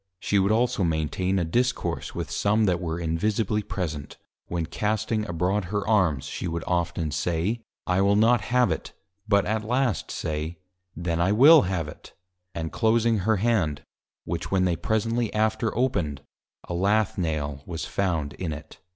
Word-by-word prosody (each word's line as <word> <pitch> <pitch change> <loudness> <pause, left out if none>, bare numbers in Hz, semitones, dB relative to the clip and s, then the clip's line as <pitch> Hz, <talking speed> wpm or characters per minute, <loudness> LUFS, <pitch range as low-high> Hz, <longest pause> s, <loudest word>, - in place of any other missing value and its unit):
She 100 - +1
would 95 +2 +2
also 120 -1 +2
maintain 85 +4 0
a 90 - +1
Discourse 120 +10 -1
with - - -4
some 105 +2 +2
that 90 -3 +1
were 85 -1 -3
Invisibly 105 +6 0
present, 85 -8 -5 0.3
when 85 -1 -2
casting 110 +3 -1
abroad 90 +4 0
her 100 +2 -2
Arms, 90 -11 +2
she 80 - -4
would 85 0 -3
often 85 -2 -1
say, 90 +9 -1 0.2
I 90 +1 +2
will 100 +1 +4
not 115 +2 +4
have 125 -3 +3
it! 80 - -4 0.3
but 100 -2 +3
at 110 0 -1
last 125 +1 0
say, 80 +2 -3 0.4
Then 85 0 -1
I 90 +3 +3
will 140 - +8
have 85 -5 -1
it! 75 - -12 0.4
and 80 -1 -3
closing 115 -1 +2
her 110 +4 +2
Hand, 95 -10 +1 0.4
which 85 0 -3
when 95 -1 +2
they 90 -2 +1
presently 110 +6 0
after 110 +1 +1
opened, 85 - 0 0.4
a - - -4
Lath 100 +3 +1
Nail 75 -4 -2
was 85 -2 -4
found 80 -7 -1
in 85 -4 -4
it. 75 0 -10
95 Hz, 165 wpm, -26 LUFS, 80-110 Hz, 0.4 s, will